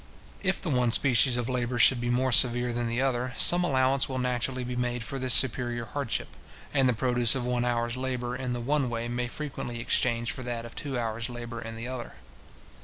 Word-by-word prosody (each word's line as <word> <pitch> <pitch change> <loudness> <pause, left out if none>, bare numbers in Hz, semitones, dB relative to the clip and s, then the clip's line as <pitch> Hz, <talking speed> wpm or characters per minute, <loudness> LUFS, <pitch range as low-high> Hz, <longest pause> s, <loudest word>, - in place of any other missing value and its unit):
If 190 -1 0
the 170 - -3
one 125 -3 +2
species 125 0 +3
of 120 -1 -2
labour 125 -1 -2
should 120 +1 +5
be 120 - -2
more 130 +2 +1
severe 120 0 +5
than 120 0 -2
the 115 +1 -2
other, 130 -1 -1
some 175 +1 +5
allowance 135 -3 +2
will 130 - -3
naturally 125 0 -1
be 125 0 -5
made 120 -1 -2
for 135 +2 -5
this 130 -1 0
superior 120 -2 +2
hardship; 135 +2 -3 0.4
and 135 -3 +3
the - - +3
produce 120 0 +2
of 125 -2 -2
one 125 0 0
hour's 120 0 -1
labour 125 -1 -3
in 125 -2 -3
the 120 - -4
one 140 +1 0
way 115 0 -3
may 120 +1 -2
frequently 125 -4 -6
exchange 120 0 0
for - - -6
that 120 -2 -4
of 115 - -10
two 140 -3 -4
hour's 115 0 -2
labour 120 -1 -7
in 115 0 -7
the 115 +2 -6
other. 125 -2 -6
125 Hz, 215 wpm, -28 LUFS, 120-130 Hz, 0.4 s, should